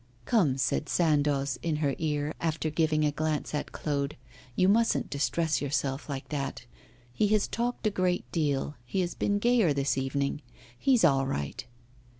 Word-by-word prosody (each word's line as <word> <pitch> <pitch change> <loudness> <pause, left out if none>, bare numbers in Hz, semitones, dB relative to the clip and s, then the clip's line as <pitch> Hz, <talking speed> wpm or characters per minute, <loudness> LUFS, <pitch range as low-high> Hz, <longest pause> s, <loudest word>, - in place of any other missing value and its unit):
'Come,' 160 - +2
said 135 +2 0
Sandoz 145 -5 +1
in 165 -2 -1
her 145 -2 0
ear, 150 -1 -1
after 160 -1 -1
giving 155 -1 +2
a 150 - +2
glance 155 0 -2
at 150 - -3
Claude, 140 -1 -2 0.4
'you 185 - +3
mustn't 225 +3 +2
distress 155 +2 0
yourself 140 0 -2
like 135 -1 -5
that. 140 -4 -4 0.5
He 210 - +2
has 210 0 +2
talked 240 0 -2
a 215 - +3
great 185 -2 0
deal, 150 -3 0
he 155 +11 -1
has 175 -1 -2
been 205 - 0
gayer 225 -7 +3
this 140 -1 0
evening. 140 +2 -1 0.3
He's 250 - +3
all 135 -4 +3
right. 70 - -3
150 Hz, 160 wpm, -29 LUFS, 140-180 Hz, 0.5 s, you